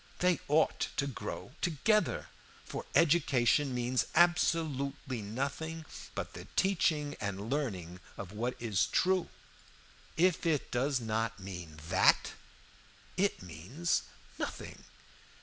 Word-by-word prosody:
They 180 -3 +3
ought 155 +2 +3
to 140 - +2
grow 115 -7 -5
together, 210 +6 +1 0.4
for - - -6
education 145 -4 +4
means 125 +1 +1
absolutely 145 -7 +2
nothing 140 +9 -3 0.3
but - - -4
the - - -8
teaching 155 -6 +2
and 100 +2 -3
learning 95 - -2 0.2
of 95 -2 -6
what 120 +4 -2
is 110 -6 +1
true. 185 0 +2 0.9
If 180 +1 +3
it 150 -4 0
does 130 +2 +1
not 115 -1 -1
mean 90 -5 -8
that, - - +4 0.8
it 195 - +1
means 95 - -1 0.4
nothing. - - -5
135 Hz, 110 wpm, -32 LUFS, 110-165 Hz, 0.9 s, education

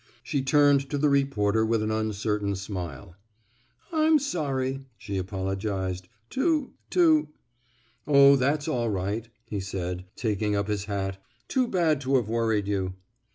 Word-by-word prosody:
She 140 - -1
turned 140 0 +4
to 145 - -1
the 150 +1 +3
reporter 110 -7 +2
with 110 -1 +1
an 110 - -1
uncertain 105 -2 -1
smile. 90 -6 -6 0.8
I'm 315 0 +5
sorry, 135 - -2
'* 115 - -41
she 100 -2 -5
apologized, 95 -1 -3
'* 110 - -43
to 295 0 +1
— - - -43
to 320 -4 +4 0.4
— 120 0 -37
Oh, 140 -1 +7
that's 145 +3 +1
all 120 -7 0
right," 105 +3 -2 0.2
he 110 -3 -4
said, 90 -1 -4
taking 105 -2 -1
up 100 0 0
his 100 -1 -1
hat. 95 -2 -3 0.3
Too 255 -2 +1
bad 165 - +1
to 135 0 +1
have 120 -5 +2
worried 110 -3 +1
you." 95 -2 -1
110 Hz, 155 wpm, -27 LUFS, 100-140 Hz, 0.8 s, Oh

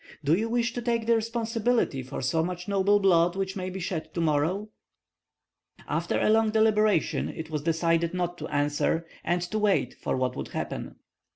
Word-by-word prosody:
Do 145 +2 +3
you 220 +5 -1
wish 235 0 0
to 245 - -3
take 235 -1 0
the 230 0 +4
responsibility 230 - 0
for 130 +1 -6
so 160 +5 +1
much 180 +1 -4
noble 200 +1 +3
blood 175 -3 +4
which 195 0 -2
may 185 -1 -3
be 190 +1 -6
shed 160 -3 -4
to - - -1
morrow?" 165 +6 0 1.2
After - - -1
a - - +2
long 220 0 +4
deliberation 215 -4 +2
it 160 0 -7
was 150 -2 -2
decided 165 +1 +1
not 175 -1 -2
to - - -5
answer, 145 +3 0 0.2
and 175 0 0
to 215 +5 -2
wait 200 - +2
for - - -1
what 130 0 -1
would - - -5
happen. - - -5
185 Hz, 185 wpm, -27 LUFS, 165-215 Hz, 1.2 s, the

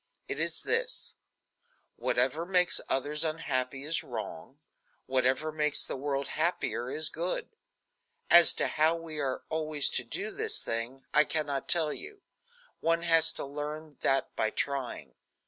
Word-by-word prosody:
It - - -4
is - - -1
this: - - -1 0.8
Whatever 165 - 0
makes 180 0 +2
others 145 +4 0
unhappy 135 -4 -2
is 155 +3 -1
wrong; - - -7 0.5
whatever 130 +4 +1
makes 150 -1 +1
the - - -4
world 140 0 -2
happier 155 -7 -1
is 155 +3 -1
good. 170 +3 -3 0.8
As 170 -1 +10
to - - -1
how 155 +2 +2
we 165 -2 -6
are 135 -3 -2
always 155 -2 +3
to - - 0
do 415 +2 -4
this, 430 +1 0
I 130 +6 0
can 155 0 -2
not 140 -2 -4
tell 160 -3 +3
you. 410 0 -9 0.6
One 165 +1 +1
has 165 -1 +4
to - - -6
learn 150 +1 -6
that 135 0 +1
by 110 - +1
trying. 125 - -3
155 Hz, 145 wpm, -30 LUFS, 135-165 Hz, 0.8 s, As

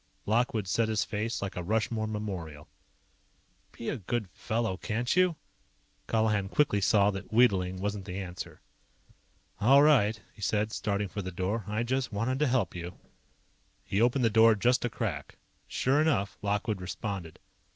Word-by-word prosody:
Lockwood 110 -2 +1
set 110 +4 +1
his 110 -2 +1
face 110 +1 -3
like 100 - -4
a 90 - -3
Rushmore 110 +3 -1
memorial. 95 -9 -5 1.0
"Be 115 - -8
a - - -2
good 110 -1 -3
fellow, 115 -4 -2
can't 115 +5 -1
you?" 180 -2 +4 0.7
Colihan 105 -3 +1
quickly 105 -7 +2
saw 100 0 +4
that 95 0 -7
wheedling 95 -6 +3
wasn't 100 0 -3
the 95 -1 -5
answer. 90 -2 -7 1.0
"All 135 +6 +6
right," 115 -8 +4
he - - -16
said, 105 +2 0
starting 100 -1 -1
for 100 +2 -5
the 95 - -5
door. 95 +4 -2
"I 105 +3 -1
just 130 +1 -1
wanted 115 +6 -1
to 150 - +3
help 120 -8 +1
you." 85 0 -6 0.9
He 100 - -1
opened 125 +1 +3
the 115 - +3
door 110 +1 +6
just 125 +5 +2
a 120 - 0
crack. 85 -13 -4 0.3
Sure 135 +4 +2
enough, 110 -11 +1
Lockwood 105 0 -1
responded. 95 -2 -5
105 Hz, 160 wpm, -29 LUFS, 95-115 Hz, 1.0 s, All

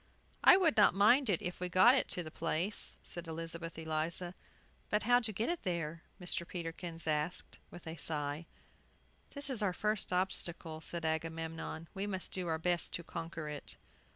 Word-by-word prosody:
"We 370 - +10
would 335 -8 +3
not 210 -3 +7
mind 230 +6 +5
if 180 -1 -1
we 180 0 -2
got 185 +8 +7
it 270 - +2
to 180 - -1
the 155 - -8
place," 180 +8 -2
said 175 -1 -7
Elizabeth 165 0 -5
Eliza. 160 +2 -2 0.6
"But 210 - +1
how 245 +2 +5
to 225 -3 +1
get 215 +4 -1
it 345 -1 -1
there?" 170 -3 -2 0.2
Mr. 175 -1 -2
Peterkin 170 -1 -5
asked, 155 +3 -2
with 175 - -11
a 160 +1 -6
sigh. 150 +1 -2 0.9
"This 285 0 -4
is 255 -5 -1
our 195 -3 +1
first 210 0 0
obstacle," 175 -3 0
said 170 0 -1
Agamemnon; 160 0 -3
"we 195 +1 -3
must 190 -2 0
do 185 -2 -2
our 160 -1 +1
best 175 +1 +1
to 170 - -2
conquer 165 -1 -5
it." 150 -1 -5
170 Hz, 175 wpm, -34 LUFS, 160-195 Hz, 0.9 s, We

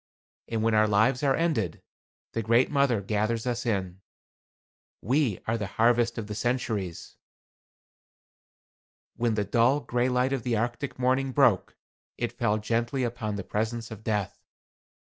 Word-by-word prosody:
And 115 -1 -2
when 115 0 +2
our 110 0 +4
lives 110 +5 +3
are 135 -2 +3
ended, 125 - 0 0.5
the 115 - -1
Great 115 +5 +3
Mother 140 -7 +2
gathers 110 +3 -1
us 120 -1 -2
in. 95 -4 -2 1.0
We 125 - +1
are 115 +1 -1
the 100 - -3
harvest 120 +1 +3
of 115 - -3
the 105 - -6
centuries." 110 -6 -3 2.0
When 115 -2 0
the 105 -1 0
dull, 120 +7 +3
gray 120 0 0
light 125 +1 +1
of 135 - -1
the 115 -1 0
Arctic 120 +5 -3
morning 130 +1 +1
broke, 125 -9 +3 0.4
it 120 -1 -2
fell 115 -3 0
gently 115 +4 -1
upon 115 -3 -3
the 100 - -4
presence 115 +3 -3
of 110 -1 -9
Death. 105 -3 -2
115 Hz, 150 wpm, -27 LUFS, 110-125 Hz, 2.0 s, our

